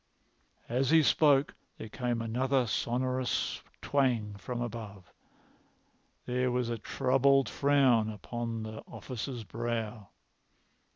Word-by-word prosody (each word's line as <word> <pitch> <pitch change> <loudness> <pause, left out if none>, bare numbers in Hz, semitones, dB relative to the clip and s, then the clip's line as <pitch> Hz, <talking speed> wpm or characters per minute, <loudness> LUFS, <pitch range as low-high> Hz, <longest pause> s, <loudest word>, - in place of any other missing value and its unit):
As 130 +2 0
he 160 0 +6
spoke 140 +1 +4 0.2
there - - -7
came 120 0 -2
another 130 +3 +1
sonorous 125 +2 -1 0.2
twang 125 -7 +1
from 120 +4 -5
above. 110 -6 -6 1.1
There 125 +1 0
was 125 -1 0
a 115 -1 -3
troubled 135 +3 +3
frown 135 -6 +3
upon 115 +2 -4
the 110 0 -7
officer's 125 -1 -6
brow. 115 -2 -4
120 Hz, 105 wpm, -31 LUFS, 115-130 Hz, 1.1 s, he